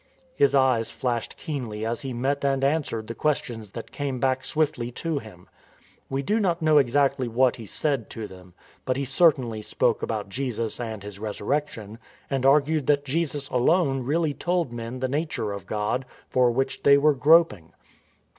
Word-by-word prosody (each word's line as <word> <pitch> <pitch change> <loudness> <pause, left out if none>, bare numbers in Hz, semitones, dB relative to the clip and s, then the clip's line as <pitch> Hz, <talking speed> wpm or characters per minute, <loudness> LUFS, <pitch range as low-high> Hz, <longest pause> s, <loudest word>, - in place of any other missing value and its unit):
His 140 0 +3
eyes 130 -4 +3
flashed 120 -3 -3
keenly 115 -8 -4
as 115 +1 -2
he 135 -2 -5
met 135 +4 -1
and 135 -1 +1
answered 140 -6 0
the 115 - -6
questions 125 -7 -2
that 115 +3 -8
came 140 -3 -3
back 130 0 +1
swiftly 145 -6 -1
to 160 +2 -2
him. 105 -7 -14 0.6
We 135 +1 -2
do 210 +9 +1
not 175 -5 +1
know 155 -2 +5
exactly 135 -1 +2
what 125 +2 +2
he 115 -3 -9
said 140 -4 -1
to 110 - -6
them, 90 -2 -13 0.3
but 130 0 -1
he 140 - -1
certainly 130 -6 +2
spoke - - 0
about 110 -3 -3
Jesus 115 0 -3
and 110 -4 -5
His 100 -1 -9
Resurrection, 110 0 -3 0.3
and 135 -1 +1
argued 150 +1 +3
that 145 -1 +2
Jesus 145 -1 -1
alone 135 +1 +2
really 150 +4 0
told 175 -5 -1
men 120 +1 -5
the 130 - 0
nature 145 -6 -2
of 100 -2 -7
God, 110 +5 -1 0.3
for 125 -1 +4
which 135 +3 -1
they 140 0 +6
were 150 +1 +4
groping. 145 - +4
130 Hz, 175 wpm, -25 LUFS, 115-145 Hz, 0.6 s, they